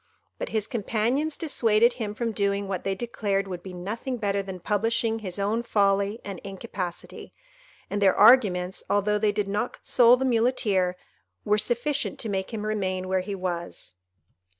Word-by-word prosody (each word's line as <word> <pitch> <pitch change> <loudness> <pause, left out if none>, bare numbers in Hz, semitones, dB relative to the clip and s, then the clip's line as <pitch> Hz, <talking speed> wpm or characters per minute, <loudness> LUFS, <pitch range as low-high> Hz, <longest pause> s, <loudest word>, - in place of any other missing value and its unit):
But - - -3
his 220 -2 0
companions 235 +7 -1
dissuaded 235 -7 +3
him 220 -4 -5
from 230 0 -2
doing 200 -1 -1
what 190 -1 -3
they 195 - -1
declared 200 -3 -2
would 180 -2 -6
be 190 - -9
nothing 215 +8 -4
better 200 -2 0
than 190 -2 -7
publishing 225 +4 0
his 190 -4 -6
own 205 +3 0
folly 200 -1 +1
and 195 -3 -6
incapacity; 195 -3 -7 0.5
and 205 - -3
their 195 -2 +5
arguments, 200 -5 +5
although 210 +1 +2
they 210 0 +2
did 205 -1 -2
not 205 +4 -2
console 245 0 +4
the 265 - -1
Muleteer, 225 -7 +1 0.5
were 210 0 +3
sufficient 260 +6 -1
to 225 - -4
make 190 +1 -2
him 215 -2 -4
remain 185 -3 -2
where 185 0 +1
he 195 +2 -5
was. 175 - -5
205 Hz, 165 wpm, -26 LUFS, 195-230 Hz, 0.5 s, their